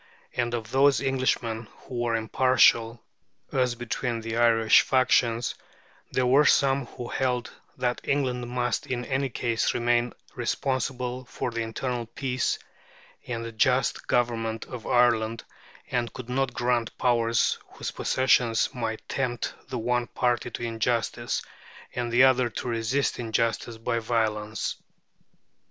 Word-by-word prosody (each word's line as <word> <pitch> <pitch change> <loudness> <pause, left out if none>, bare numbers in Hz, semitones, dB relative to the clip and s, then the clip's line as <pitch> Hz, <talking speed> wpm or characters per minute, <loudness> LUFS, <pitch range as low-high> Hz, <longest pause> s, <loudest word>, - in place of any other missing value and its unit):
And 120 -1 0
of 115 -2 -6
those 140 +1 +4
Englishmen 130 -4 -1
who 125 - -6
were 120 -1 +1
impartial 115 0 +3 0.5
as 125 -2 +1
between 120 0 -3
the 115 0 -4
Irish 115 -2 +5
factions, 120 -2 +2 0.6
there 130 - +1
were 140 +4 +5
some 135 -2 +3
who 120 - -8
held 125 -2 -1 0.3
that 125 -1 -1
England 125 -3 -1
must 125 0 -1
in 125 -1 -2
any 135 0 -1
case 115 -1 0
remain 120 0 +2 0.2
responsible 130 -1 -2
for 125 - -4
the 115 0 -2
internal 120 +1 -3
peace 130 +1 -1 0.7
and 115 -1 -3
the 115 - -5
just 125 +4 +1
government 115 -2 0
of 125 -3 -8
Ireland, 115 -2 +2 0.5
and 120 -2 0
could 125 -2 -9
not 135 +1 0
grant 120 -2 -1
powers 115 -2 +2
whose - - -5
possession 125 -3 +2 0.2
might 115 -3 -4
tempt 125 -3 -2
the 130 - -4
one 120 +1 0
party 120 -1 0
to - - -6
injustice, 115 0 -1 0.5
and 120 -1 -2
the 120 +2 +6
other 130 -2 +4
to 120 - -5
resist 120 +4 0
injustice 115 0 -1
by 115 +1 -1
violence. 110 -2 -1
120 Hz, 135 wpm, -26 LUFS, 115-125 Hz, 0.7 s, the